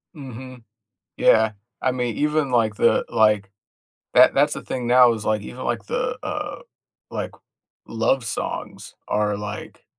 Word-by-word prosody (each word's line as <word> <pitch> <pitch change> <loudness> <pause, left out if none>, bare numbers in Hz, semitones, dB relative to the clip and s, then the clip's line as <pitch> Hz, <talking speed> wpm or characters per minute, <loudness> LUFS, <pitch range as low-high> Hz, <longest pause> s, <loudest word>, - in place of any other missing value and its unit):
Mhm. 130 -3 -10 0.5
Yeah, 110 -1 +4 0.3
I 130 - +2
mean, 125 -3 -2
even 150 -1 +1
like 110 -4 +2
the, - - +3
like 105 -3 +2 0.6
That - - +7
that's - - +3
the - - -6
thing 125 -2 -4
now 125 -1 +6
is, 110 -2 -6
like, 110 -1 +1
even 125 +5 -8
like 115 -3 -2
the, 250 0 -2
uh, - - -4 0.5
like, - - -4 0.6
love 115 +3 +1
songs 105 - -5
are, 105 -1 0
like 105 0 -7
120 Hz, 145 wpm, -23 LUFS, 105-130 Hz, 0.6 s, That